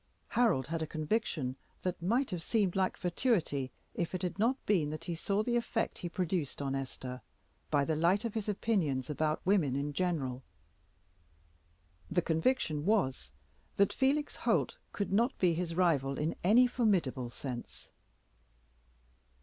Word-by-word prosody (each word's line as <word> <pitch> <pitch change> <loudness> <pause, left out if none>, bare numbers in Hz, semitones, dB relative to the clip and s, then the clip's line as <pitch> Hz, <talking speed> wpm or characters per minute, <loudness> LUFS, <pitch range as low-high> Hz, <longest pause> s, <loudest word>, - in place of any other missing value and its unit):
Harold 225 - +3
had 165 +3 -3
a 160 - -2
conviction 155 - -1 0.3
that 180 -2 -2
might 235 +8 +1
have 175 -2 -3
seemed 200 -1 +1
like 190 -1 +1
fatuity 175 - 0 0.2
if 175 +1 -2
it 185 - -3
had 180 +2 -3
not 240 +5 +3
been 175 -8 +2
that 155 +1 -5
he 175 - -3
saw 200 +5 0
the 240 +1 0
effect 235 -1 -1
he 175 - -4
produced 175 -5 -2
on 140 -1 -2
Esther 130 -2 -5 0.5
by 145 -2 +3
the 160 - 0
light 180 +8 +2
of 230 - -2
his 220 -2 -2
opinions 160 - 0
about 155 +1 -1
women 180 -9 +3
in 145 +1 -2
general. 145 -7 -1 1.7
The 175 0 +1
conviction 160 - +1
was, 135 - +1 0.5
that 200 -1 +4
Felix 285 +3 +1
Holt - - +1 0.2
could 200 -1 -2
not 235 +6 +2
be 180 -2 +3
his 165 0 -2
rival 145 -7 +2
in 155 +2 0
any 225 +7 +6
formidable 185 - +1
sense. 120 0 -7
175 Hz, 150 wpm, -32 LUFS, 145-210 Hz, 1.7 s, any